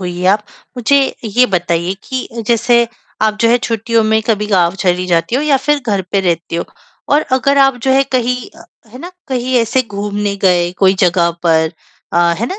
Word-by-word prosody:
होइए 180 0 -4
आप, 210 +2 +2 0.3
मुझे 270 +3 +2
ये 240 +4 +3
बताइए 175 -2 -1
कि 260 -1 -4
अ, 230 - -7
जैसे 235 +1 +2 0.4
आप 215 -1 +1
जो 230 - +4
है 240 - +4
छुट्टियों 230 -1 0
में 220 0 +2
कभी 210 -2 0
गाँव 180 -4 +2
चली 180 0 +1
जाती 170 +4 0
हो 270 - +1
या 300 -2 +3
फ़िर 290 +2 0
घर 200 -3 0
पे 200 - +2
रहते 170 -2 -2
हो 170 - -2 0.5
और 295 - +4
अगर 275 +2 +2
आप 270 -2 +4
जो 265 - +1
है 270 +1 +4
कहीं 250 -1 +1 0.5
है 250 - -11
ना? 345 +6 -8 0.2
कहीं 255 -1 -2
ऐसे 235 +3 +1
घूमने 205 -2 -3
गए 175 -2 +3
कोई 190 -1 +4
जगह 170 -1 +2
पर 160 -2 +2 0.4
अ, - - 0 0.2
है 230 - -1
ना? 380 - -6
220 Hz, 200 wpm, -15 LUFS, 185-250 Hz, 0.5 s, जो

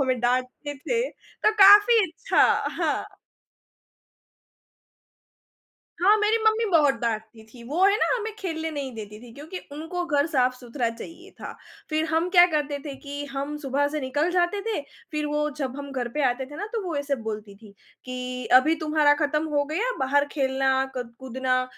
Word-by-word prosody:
हमें 255 -3 0
डाँटते 255 +4 -1
थे, 465 - -1
तो - - -2
काफ़ी 415 +4 +8
अच्छा 335 +10 +1 0.3
हाँ। - - -2 2.8
हाँ, 400 +4 +5
मेरी 425 +1 +2
मम्मी 440 +1 +3
बहुत 295 -5 +4
डाँटती 220 -1 -3
थी, 235 +1 -15
वो 315 +10 +1
है 400 +1 +5
ना - - +1
हमें 440 -2 -4
खेलने 320 -5 -3
नहीं 280 -4 -5
देती 210 -1 -8
थी 240 -2 -12
क्योंकि 315 +6 -8
उनको 325 +4 -4
घर 290 -1 +2
साफ-सुथरा 250 -3 -1
चाहिए 335 +10 -11
था। - - -6 0.4
फिर 310 +1 +1
हम 330 +2 +1
क्या 355 -1 +7
करते 290 -1 -1
थे 285 - -6
कि 285 0 -6
हम 280 +2 -3
सुबह 280 +2 +1
से 305 +1 -3
निकल 290 +5 0
जाते 360 +3 +1
थे, 430 - -1 0.3
फिर 300 -1 -2
वो 300 0 0
जब 265 0 -3
हम 280 0 -7
घर 245 -2 -2
पे 300 - +1
आते 260 +2 -4
थे 295 +2 -11
ना, 410 - -4
तो 455 -3 -2
वो 330 -4 -3
ऐसे 285 0 -1
बोलती 210 -2 -6
थी 205 -2 -16 0.3
कि 255 -1 -5
अभी 315 +4 +1
तुम्हारा 305 -1 +3
ख़त्म 300 +1 0
हो 290 -1 +1
गया, 385 +12 -1
बाहर 280 +2 +2
खेलना, 265 -1 +1
क 245 -2 -4
कूदना 255 0 -1
290 Hz, 175 wpm, -25 LUFS, 255-330 Hz, 2.8 s, काफ़ी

